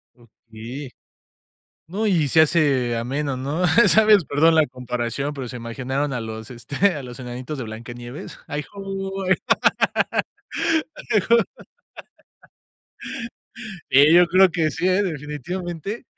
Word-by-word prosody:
Okey, 120 Hz, +3 st, -10 dB, 1.0 s
no, 205 Hz, +7 st, -2 dB
y 165 Hz, -8 st, +2 dB
se 160 Hz, +3 st, +6 dB
hace 140 Hz, -7 st, +2 dB
ameno, 135 Hz, +4 st, -2 dB
¿no?, 150 Hz, +7 st, -1 dB, 0.2 s
¿sabes?, 215 Hz, -5 st, +5 dB
perdón 160 Hz, +3 st, +3 dB
la 155 Hz, -1 st, +4 dB
comparación, 125 Hz, +2 st, -3 dB
pero, 135 Hz, -4 st, -6 dB
se 125 Hz, -, -7 dB
me 115 Hz, -, -10 dB
imaginaron 135 Hz, +4 st, -2 dB
a 125 Hz, -, -2 dB
los, 110 Hz, 0 st, -7 dB
este, 145 Hz, +10 st, 0 dB
a 145 Hz, -, -5 dB
los 125 Hz, -1 st, -9 dB
enanitos 125 Hz, +4 st, -6 dB
de 130 Hz, -, -4 dB
Blancanieves. 120 Hz, -, -9 dB
Ay 150 Hz, 0 st, -4 dB
ho, 195 Hz, 0 st, -5 dB
ay 190 Hz, +1 st, +4 dB, 1.8 s
ay 210 Hz, -, +5 dB
ho 235 Hz, -, +8 dB, 2.5 s
eh, 145 Hz, +5 st, +6 dB
yo 175 Hz, 0 st, +7 dB
creo 185 Hz, +2 st, +5 dB
que 165 Hz, -3 st, 0 dB
sí, 185 Hz, -, -1 dB
¿eh?, 185 Hz, +2 st, +3 dB
definitivamente. 175 Hz, -, -5 dB
145 Hz, 130 wpm, -22 LUFS, 125-180 Hz, 2.5 s, ho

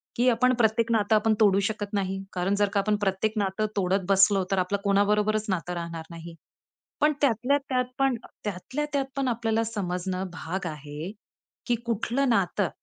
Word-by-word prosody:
की 245 Hz, +2 st, +2 dB
आपण 250 Hz, +2 st, +3 dB
प्रत्येक 230 Hz, 0 st, +2 dB
नातं 215 Hz, -1 st, +3 dB
आपण 215 Hz, +1 st, +3 dB
तोडू 200 Hz, -2 st, +5 dB
शकत 210 Hz, -1 st, -3 dB
नाही. 195 Hz, -1 st, -1 dB
कारण 185 Hz, +2 st, 0 dB
जर 205 Hz, -1 st, +2 dB
का 200 Hz, -, +3 dB
आपण 210 Hz, +1 st, +1 dB
प्रत्येक 195 Hz, +3 st, 0 dB
नातं 200 Hz, +1 st, 0 dB
तोडत 190 Hz, -1 st, +1 dB
बसलो, 195 Hz, 0 st, +5 dB
तर 195 Hz, -, +2 dB
आपलं 185 Hz, +2 st, 0 dB
कोणाबरोबरच 210 Hz, +2 st, +2 dB
नातं 180 Hz, -1 st, -2 dB
राहणार 170 Hz, -1 st, -5 dB
नाही. 165 Hz, 0 st, -9 dB, 0.7 s
पण 300 Hz, 0 st, +4 dB
त्यातल्या 265 Hz, +1 st, +2 dB
त्यात 255 Hz, -1 st, +1 dB
पण 270 Hz, -3 st, +2 dB, 0.3 s
त्यातल्या 210 Hz, +9 st, -3 dB
त्यात 280 Hz, -1 st, +1 dB
पण 275 Hz, -1 st, 0 dB
आपल्याला 225 Hz, -1 st, 0 dB
समजणं 185 Hz, -3 st, -3 dB
भाग 180 Hz, +2 st, -4 dB
आहे 150 Hz, +2 st, -6 dB, 0.6 s
की 240 Hz, -, +2 dB
कुठलं 240 Hz, +4 st, 0 dB
नातं 200 Hz, -4 st, +1 dB
205 Hz, 170 wpm, -26 LUFS, 190-230 Hz, 0.7 s, तोडू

